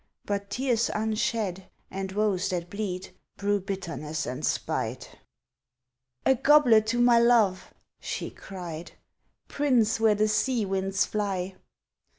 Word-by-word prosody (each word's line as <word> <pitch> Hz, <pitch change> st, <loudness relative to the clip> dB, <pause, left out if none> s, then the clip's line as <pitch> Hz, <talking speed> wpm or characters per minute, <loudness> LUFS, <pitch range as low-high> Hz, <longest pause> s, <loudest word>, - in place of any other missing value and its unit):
(But 200 Hz, -1 st, -3 dB
tears 245 Hz, -3 st, 0 dB
unshed 215 Hz, -3 st, -1 dB, 0.3 s
and 190 Hz, 0 st, -4 dB
woes 200 Hz, -2 st, +1 dB
that 175 Hz, -2 st, -3 dB
bleed 190 Hz, -4 st, -4 dB, 0.2 s
Brew 205 Hz, 0 st, +1 dB
bitterness 170 Hz, -6 st, -4 dB
and 130 Hz, +4 st, -5 dB
spite.) -, -, -3 dB, 1.1 s
"A 265 Hz, -, +6 dB
goblet 250 Hz, -5 st, +5 dB
to 240 Hz, +2 st, 0 dB
my 240 Hz, -1 st, +6 dB
love!" 230 Hz, -6 st, +3 dB, 0.3 s
she -, -, -4 dB
cried, 175 Hz, -4 st, -8 dB, 0.5 s
"Prince 245 Hz, -7 st, +2 dB
where 220 Hz, -1 st, +4 dB
the 215 Hz, +1 st, +2 dB
sea 215 Hz, +2 st, +1 dB
winds 195 Hz, 0 st, 0 dB
fly!" 195 Hz, -3 st, -2 dB
205 Hz, 120 wpm, -27 LUFS, 190-225 Hz, 1.1 s, A